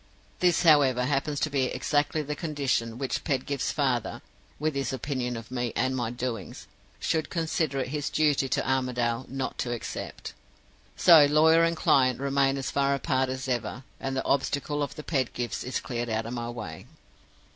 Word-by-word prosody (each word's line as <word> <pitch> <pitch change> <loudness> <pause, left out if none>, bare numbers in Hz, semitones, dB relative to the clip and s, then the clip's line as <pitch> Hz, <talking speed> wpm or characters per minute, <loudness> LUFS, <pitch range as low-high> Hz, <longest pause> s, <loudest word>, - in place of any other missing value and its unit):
This, 180 0 +3
however, 140 -6 +5
happens 145 +1 0
to 155 - 0
be 135 -2 +2
exactly 145 +3 0
the 150 +1 -4
condition 140 -8 -1
which 135 0 -2
Pedgift's 140 0 -1
father 130 -5 -1 0.3
with 155 +1 -1
his 140 -1 -2
opinion 130 -2 -3
of 115 +1 -10
me 120 -2 -2
and 130 +2 +1
my 120 -3 -1
doings 120 -4 -5 0.3
should 160 -1 -1
consider 160 -3 -1
it 130 - -4
his 145 0 -2
duty 145 -3 +2
to - - 0
Armadale 125 -2 0
not 135 0 -4
to 120 - -1
accept. 120 - -6 0.6
So 165 -4 +8
lawyer 160 +3 +5
and 165 0 +1
client 130 -5 +3
remain 140 0 +1
as 135 - -3
far 140 0 +2
apart 130 -1 0
as 130 +1 -4
ever, 125 0 -2 0.2
and 135 0 -3
the - - -2
obstacle 145 +2 0
of 145 - -3
the 150 - -7
Pedgifts 125 -6 -2
is 125 +1 -2
cleared 120 -1 -4
out 110 0 -1
of 115 - -5
my 120 -1 -4
way. 100 -4 -7
135 Hz, 175 wpm, -27 LUFS, 125-145 Hz, 0.6 s, So